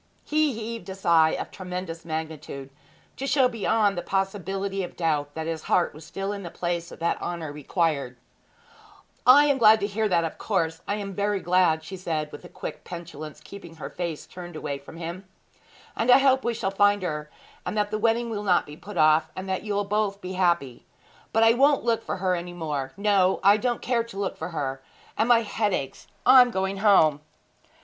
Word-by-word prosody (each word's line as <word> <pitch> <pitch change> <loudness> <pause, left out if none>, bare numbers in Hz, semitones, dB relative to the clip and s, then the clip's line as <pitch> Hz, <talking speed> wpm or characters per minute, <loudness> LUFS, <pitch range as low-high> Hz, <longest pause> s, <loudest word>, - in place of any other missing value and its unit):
He 305 -2 +2
heaved 225 -1 -6
a 190 - -5
sigh 165 -4 +4
of - - -5
tremendous 180 -3 -6
magnitude, 155 -4 -6 0.5
to 275 - -3
show 270 -2 +4
beyond 220 -3 +1
the 175 - -2
possibility 195 +1 -2
of 175 - -7
doubt 150 -4 -1
that 160 0 -4
his 160 -1 -4
heart 175 - +2
was 155 +2 -12
still 195 +1 -4
in 200 - -6
the 175 - -6
place 170 0 -3
that 170 0 -2
honour 170 -4 -4
required. 145 -4 -1 1.1
'I 285 +4 +9
am 285 -2 +2
glad 220 -1 +7
to - - +1
hear 210 +1 -1
that 170 -2 +2
of 165 - -5
course 165 -6 -1
I 205 - 0
am 200 -2 -5
very 205 0 0
glad!' 175 -3 +2
said 165 -4 -4
she, - - -23
with 175 - -11
quick - - -7
petulance, 165 -4 -8
keeping 175 -5 -11
her 160 - -7
face 170 -4 -4
turned 175 -2 -9 0.3
from 160 - -12
him. 175 +3 -6 0.7
'And 225 - -1
I 250 - +9
hope 265 -1 +3
we 235 0 -1
shall 195 -3 -2
find 205 0 +3
her, 150 -3 -3 0.3
and - - -4
that 210 0 0
the 215 - -1
wedding 230 +1 +1
will 210 -2 -3
not 180 -4 +3
be 150 - -10
put 180 +4 -10
off, 155 0 +4
and 185 +1 -6
that 190 - -1
you'll 205 -1 -1
both 205 -1 -1
be 185 -1 -6
happy. 170 -9 0 0.5
But 225 - +3
I 225 0 +6
won't 280 +3 +3
look 230 -1 +1
for - - -3
her 185 0 0
any 175 0 -4
more! 150 -6 -3
No; 200 -2 +3
I 200 +2 +6
don't 240 +1 -2
care 240 -2 +1
to 230 -4 -11
look 200 -1 -2
for - - -5
her 135 -5 -3 0.3
and 225 - +1
my 235 -1 +6
head 210 -2 0
aches. 135 -1 -6 0.2
I 260 - +9
am 245 - +4
going 190 -2 -2
home!' 165 -8 +4
190 Hz, 205 wpm, -25 LUFS, 165-210 Hz, 1.1 s, I